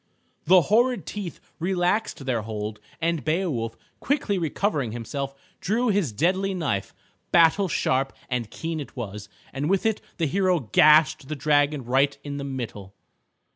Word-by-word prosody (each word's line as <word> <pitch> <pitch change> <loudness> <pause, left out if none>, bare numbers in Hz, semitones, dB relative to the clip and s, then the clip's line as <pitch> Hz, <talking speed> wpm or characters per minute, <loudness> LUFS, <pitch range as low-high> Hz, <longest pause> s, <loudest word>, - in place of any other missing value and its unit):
The 185 +2 +7
horrid 235 - +2
teeth 200 -5 -6 0.2
relaxed 180 -2 0
their 125 -4 0
hold, 105 -1 -5 0.2
and 165 -2 0
Beowulf, 155 -9 -1 0.2
quickly 265 -9 0
recovering 155 - -1
himself, 135 +4 -4 0.2
drew 230 +5 +1
his 195 - +1
deadly 185 - +1
knife. 135 - -2 0.4
Battle 170 +3 +5
sharp 135 -4 0 0.2
and 125 -4 -2
keen 165 +5 -4
it 145 - -8
was, 105 -4 -6 0.2
and 140 +3 -2
with 195 +1 +1
it 220 -1 +1 0.2
the 165 - +1
hero 185 +3 +2
gashed 155 +5 +5
the 155 - -3
dragon 145 -1 +2
right 135 +3 +2
in 145 -1 -5
the 140 - -4
middle. 115 -8 -6
150 Hz, 145 wpm, -25 LUFS, 130-185 Hz, 0.4 s, The